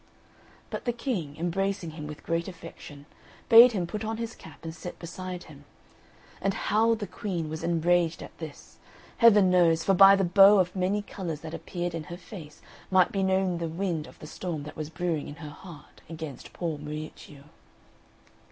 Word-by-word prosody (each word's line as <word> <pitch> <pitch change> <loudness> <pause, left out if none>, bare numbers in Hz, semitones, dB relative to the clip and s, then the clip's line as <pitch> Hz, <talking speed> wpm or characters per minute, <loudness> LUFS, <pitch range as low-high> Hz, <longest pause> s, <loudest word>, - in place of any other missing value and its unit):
But - - -5
the 240 - 0
King, 200 - -3
embracing 175 +1 -1
him 150 -1 -7
with 150 0 -9
great 165 0 -1
affection, 165 -5 -10 0.4
bade 235 +2 +9
him 185 -4 -1
put 210 +6 -5
on 220 0 -3
his 230 0 -4
cap 160 -8 -14
and 165 -1 -5
sit 175 +2 -8
beside 180 +1 -7
him; 145 -2 -14 0.8
and 195 0 0
how 225 +2 +2
the 215 -2 -5
Queen 175 -5 -4
was 160 0 -5
enraged 170 0 +1
at - - -12
this, 155 -3 -10 0.4
Heaven 210 -5 +6
knows, 165 -2 +4
for 195 - +3
by 195 +1 +8
the 195 - +1
bow 195 +3 +7
of 180 -1 +1
many 195 +3 0
colours 170 -7 -5
that 160 0 -8
appeared 175 -1 -4
in 165 -2 -5
her 175 +3 -8
face 165 -6 -11 0.3
might 185 -1 +4
be 195 - -1
known 190 -2 +1
the 170 - -2
wind 165 -2 -2
of - - -15
the - - -11
storm 160 -1 -5
that 150 - -9
was 155 -1 -5
brewing 165 -2 -2
in 145 - -8
her 155 -2 -9
heart 150 -1 -13
against 160 -4 -8
poor 165 -4 -4
Miuccio. 150 -1 -8
175 Hz, 185 wpm, -27 LUFS, 160-195 Hz, 0.8 s, bade